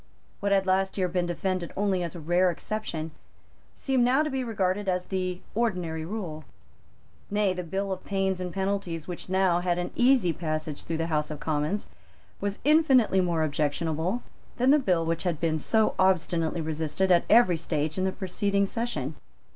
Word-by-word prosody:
What 200 0 -1
had 195 -1 +3
last 190 +1 +1
year 185 -2 +2
been 180 0 -1
defended 180 0 -2
only 195 -2 +1
as 170 0 -4
a - - -6
rare 175 +4 +2
exception 170 -3 -4 0.6
seemed 265 -3 +1
now 260 +5 +4
to 305 - -2
be 265 -1 -1
regarded 200 -3 -1
as 180 -1 0
the 185 -1 -3
ordinary 180 -8 -1
rule. 170 -6 -5 0.9
Nay, 205 -2 +2
the 180 - -4
bill 195 +3 -3
of 190 - -4
pains 190 -2 -1
and 180 -1 -3
penalties 190 -4 -2
which 180 0 -7
now 185 -2 +3
had 175 -1 0
an 175 - -3
easy 245 -9 +4
passage 155 -2 -4
through 165 - -2
the 165 - -1
House 150 0 0
of 150 -2 -6
Commons 155 +6 -1 0.5
was 200 0 -2
infinitely 265 -9 +4
more 170 -3 +1
objectionable 160 +7 -1 0.3
than 255 +2 +4
the 300 - +6
bill 180 - +1
which 165 0 -1
had 175 -5 -1
been 160 -2 0
so 220 +7 +2
obstinately 170 -3 +2
resisted 160 +4 -1
at 175 -1 +5
every 215 -6 +6
stage 155 -1 -2
in - - +1
the 190 - +1
preceding 200 +1 0
session. 190 - -3
185 Hz, 180 wpm, -27 LUFS, 165-200 Hz, 0.9 s, the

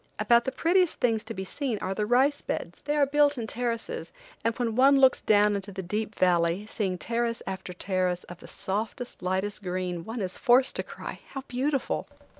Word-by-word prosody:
About 235 0 +4
the 265 - -1
prettiest 350 +4 +2
things 225 -3 +1
to 225 - -5
be 190 0 -4
seen 255 +2 -2
are 190 -1 -3
the 210 +1 -1
rice 270 +5 +3
beds. - - -5
They 295 - -1
are 285 - +5
built 290 0 +3
in 235 - -3
terraces, 240 - -3 0.3
and 230 0 0
when 230 -3 -1
one 275 +2 +6
looks 265 -1 +5
down 210 -1 +4
into 200 0 -4
the 190 0 -5
deep 210 +4 -3
valley, 175 +1 +2
seeing 195 -4 -2
terrace 235 +3 -2
after 190 -1 -5
terrace 180 -1 -1
of 175 0 -11
the - - -12
softest, 215 +6 -4
lightest 190 +3 -1
green, 180 -2 -3
one 225 +3 -5
is 185 -1 -4
forced 255 +2 +4
to - - 0
cry: - - -8
"How 270 - -5
beautiful!" 270 +2 -1
220 Hz, 200 wpm, -27 LUFS, 190-255 Hz, 0.3 s, one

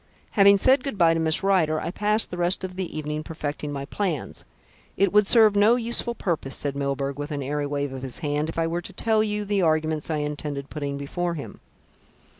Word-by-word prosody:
Having 200 -1 +6
said 260 +6 +4
good 275 -7 -4
bye 165 -2 +5
to 165 - -1
Miss 160 +3 +3
Rider, 170 -6 +2
I 170 - -4
passed 210 +3 +1
the 180 - -5
rest 175 +2 0
of 185 -1 -5
the 185 -4 -5
evening 150 0 -3
perfecting 150 -2 -5
my 140 -1 -4
plans. 175 -2 -3 0.5
It 200 -1 +2
would 210 -1 +5
serve 220 -2 +6
no 210 +4 +5
useful 235 0 -2
purpose," 160 -10 -2
said 140 -1 -2
Milburgh 140 0 -2
with 145 +1 -4
an 145 -2 -3
airy 145 +2 -2
wave 145 -1 -3
of 130 - -6
his 130 -2 -4
hand, 150 0 -2
"if 165 - -7
I 165 - +1
were 170 +1 -2
to - - -10
tell 220 -1 +2
you 210 -1 -1
the 200 -1 0
arguments 155 -2 0
I 160 - 0
intended 150 -1 -4
putting 140 -2 -4
before 170 +5 -3
him." 145 - -8
160 Hz, 220 wpm, -24 LUFS, 145-200 Hz, 0.5 s, Having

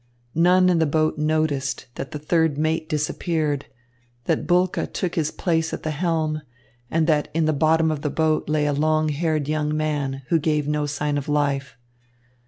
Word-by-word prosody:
None 180 +3 +4
in 175 -2 +3
the 160 - +3
boat 155 +1 +1
noticed 150 -4 0
that - - -6
the 155 - -5
third 160 0 +1
mate 155 +1 0
disappeared, 150 -1 -1 0.6
that - - -1
Bulke 180 +1 +1
took 180 -2 -2
his 155 -2 0
place 160 -2 -1
at - - -5
the 155 - -1
helm, 155 -1 -1 0.5
and 165 0 +1
that 155 -2 +2
in 165 -1 +2
the 155 - +2
bottom 160 +2 +3
of 150 -2 -3
the 150 - -1
boat 155 0 0
lay 150 -1 +1
a 145 - +1
long 155 +1 +2
haired 155 -1 -1
young 155 0 0
man, 145 -3 -2
who 165 - +3
gave 150 -1 0
no 150 0 0
sign 145 0 -1
of 140 - -7
life. 140 -4 0
155 Hz, 185 wpm, -23 LUFS, 150-160 Hz, 0.6 s, None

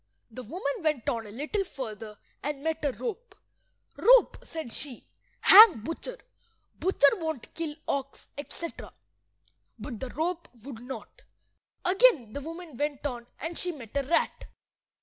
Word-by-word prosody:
The 255 - -7
woman 280 - -3
went 305 -7 0
on 230 -2 -2
a - - -10
little 305 - -2
further, 220 - -7 0.2
and 285 -1 -4
met 320 -1 -1
a 285 - +2
rope. 470 - -6 0.6
"Rope," - - +6
said 315 -9 -6
she, 270 -5 -7 0.4
"hang 415 - +10
butcher. 330 - -5 0.6
Butcher 375 0 +4
won't 315 -7 -4
kill 320 -3 -4
ox," 275 0 -3
etc. 315 +3 -6 0.8
But 235 -7 -7
the 260 - -5
rope 340 +5 -2 0.2
would 260 -4 -8
not. 250 - -9 0.6
Again 365 - +4
the 285 - -4
woman 330 -2 -8
went 290 0 -2
on, 240 -4 -4
and 330 +1 -4
she 360 - 0
met 255 -8 -11
a 280 - +3
rat. 275 +5 0
295 Hz, 145 wpm, -28 LUFS, 250-340 Hz, 0.8 s, hang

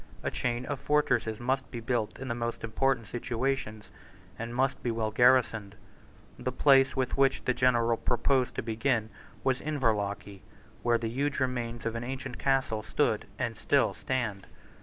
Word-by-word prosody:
A - - -1
chain 120 0 -2
of 140 -1 -3
fortresses 125 -7 +1
must 130 +2 -1
be 120 - -5
built 115 -2 -1
in 135 - -6
the 120 - -1
most 115 0 -4
important 115 +1 +1
situations, 120 -1 -3 0.5
and 115 +1 -5
must 135 +1 +1
be 120 - -1
well 115 -1 -1
garrisoned. 110 -4 +3 0.6
The 125 +1 -2
place 135 0 +5
with 130 0 -1
which 135 -1 +3
the 125 - +2
general 120 -2 +3
proposed 125 +2 +1
to - - -2
begin 115 0 0 0.3
was 130 -1 +1
Inverlochy, 105 -8 -1 0.4
where 120 -1 +3
the 115 -1 -3
huge 140 +3 -1
remains 120 -3 -2
of 115 - -1
an 115 0 -4
ancient 130 0 -5
castle 135 -5 +1
stood - - 0
and - - -2
still - - +2
stand. 120 -7 -3
120 Hz, 160 wpm, -29 LUFS, 115-130 Hz, 0.6 s, place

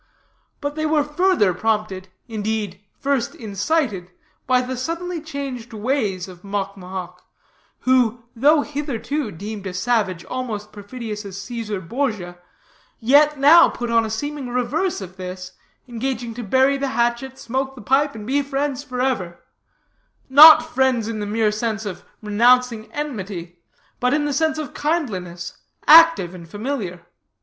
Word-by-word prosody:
But 285 -1 -2
they 310 +1 -1
were 305 -1 +2
further 300 - +2
prompted, 210 -1 -1 0.2
indeed, 215 -4 -3 0.2
first 275 -4 -1
incited, 210 - -1 0.4
by 255 0 +4
the 255 +1 -4
suddenly 335 +6 -4
changed 275 -6 -6
ways 215 -5 -1
of 180 -2 -12
Mocmohoc, 195 -2 -5 0.6
who, 245 -2 +2
though 290 +6 +4
hitherto 285 -2 -3
deemed 200 +2 -7
a 180 - -6
savage 195 -4 0
almost 220 -5 -5
perfidious 210 0 -7
as 195 -1 -8
Caesar 215 -1 -4
Borgia, 190 -4 -3 0.6
yet 290 +5 +4
now 300 +5 +7
put 240 -1 -4
on 230 -1 +4
a 220 - -3
seeming 290 +4 -4
the 245 - -7
reverse 285 - -1
of 185 0 -9
this, 185 0 -7 0.4
engaging 240 -1 -3
to 245 - -6
bury 260 +6 +3
the 275 0 -2
hatchet, 240 +3 0
smoke 265 +3 -3
the 250 - -10
pipe, 280 +3 +2
and 210 -1 -8
be 275 +5 +1
friends 280 -1 -2
forever; 250 -10 -2 0.9
not 310 +3 +10
friends 260 -7 +1
in 225 -1 -4
the 205 - -3
mere 215 0 +1
sense 220 0 -2
of 195 -3 -6 0.2
renouncing 235 +1 +3
enmity, 190 - -5 0.4
but 250 +2 +2
in 295 0 0
the 290 - -1
sense 315 +2 +1
of 305 -4 -5
kindliness, 190 - -3 0.3
active 325 - +7
and 170 -2 -11
familiar. 205 -4 -4
235 Hz, 145 wpm, -21 LUFS, 205-280 Hz, 0.9 s, not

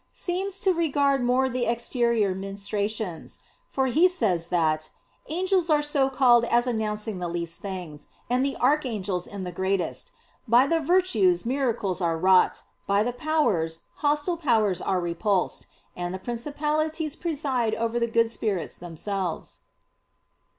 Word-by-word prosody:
seems 380 +2 -2
to 380 - +3
regard 285 -5 +1
more 250 +2 +2
the 255 -1 -1
exterior 235 -3 +1
ministrations; 200 -1 -4 0.3
for 265 - 0
he 315 +8 +4
says 190 - 0
that 155 -3 0 0.4
"angels 365 +2 0
are 300 -1 +3
so 285 -2 +2
called 250 -3 +5
as 240 +1 +2
announcing 215 -3 -2
the 175 - -3
least 170 -1 -4
things; 180 -7 -6 0.2
and 250 +2 +1
the 275 0 -1
archangels 225 - 0
in 200 -2 -7
the 180 - -5
greatest; 190 - -2 0.4
by 240 +3 +6
the 330 +3 +1
virtues 360 0 +2
miracles 235 -8 -1
are 165 -2 +1
wrought; 185 +2 +3 0.2
by 200 +1 +3
the 245 +2 -2
powers 215 - 0 0.2
hostile 295 +4 0
powers 220 - +2
are 190 -1 0
repulsed; 180 +3 -1 0.3
and 175 +1 -4
the - - -3
principalities 300 - -2
preside 275 -9 -1
over 230 +1 -1
the 235 - +1
good 230 0 +2
spirits 205 -6 -3
themselves." 175 +1 -4
235 Hz, 140 wpm, -26 LUFS, 190-290 Hz, 0.4 s, by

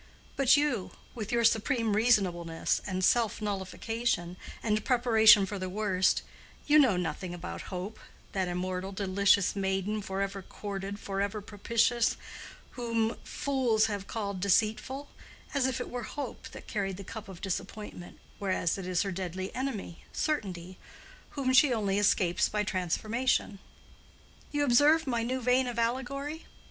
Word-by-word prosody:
But 275 0 +5
you, 285 -10 0 0.2
with 220 -2 -5
your 235 -1 +2
supreme 225 -1 +2
reasonableness, 185 -8 +2
and 185 -1 -2
self 230 -1 +2
nullification, 205 -1 -2 0.3
and 215 -1 +1
preparation 225 -4 +6
for 200 +1 -5
the 185 0 -3
worst—you 205 +9 +1
know 250 -10 +5
nothing 175 +1 -3
about 175 - -7
Hope, 190 +4 -5 0.3
that 190 -2 -1
immortal, 185 +2 -3
delicious 200 0 +3
maiden 195 +2 -1
forever 195 0 -3
courted 200 +1 -6
forever 200 +2 -2
propitious, 230 +3 +1 0.5
whom 230 -2 -1
fools 250 -6 +1
have 205 -3 -3
called 200 -4 -3
deceitful, 215 +8 +1 0.5
as 275 -2 +2
if 260 -1 -2
it 245 - -4
were 245 - -3
Hope 280 +5 -6
that - - -11
carried 195 -3 -2
the 200 - -7
cup 215 +1 -8
of 185 -3 -9
disappointment, 195 -1 -5 0.2
whereas 190 -2 0
it 185 - -6
is 180 -1 +1
her 195 - -3
deadly 185 0 -4
enemy, 240 -10 -4
Certainty, 185 - -3 0.6
whom 260 -2 +1
she 270 +1 +6
only 205 -4 +1
escapes 190 -3 +2
by 210 0 0
transformation. 210 +4 0 0.9
(You 290 0 +1
observe 290 +5 +5
my 240 -4 0
new 255 +3 -2
vein 250 +1 +3
of 240 -1 -4
allegory?) 275 +6 -2
210 Hz, 140 wpm, -30 LUFS, 190-240 Hz, 0.9 s, preparation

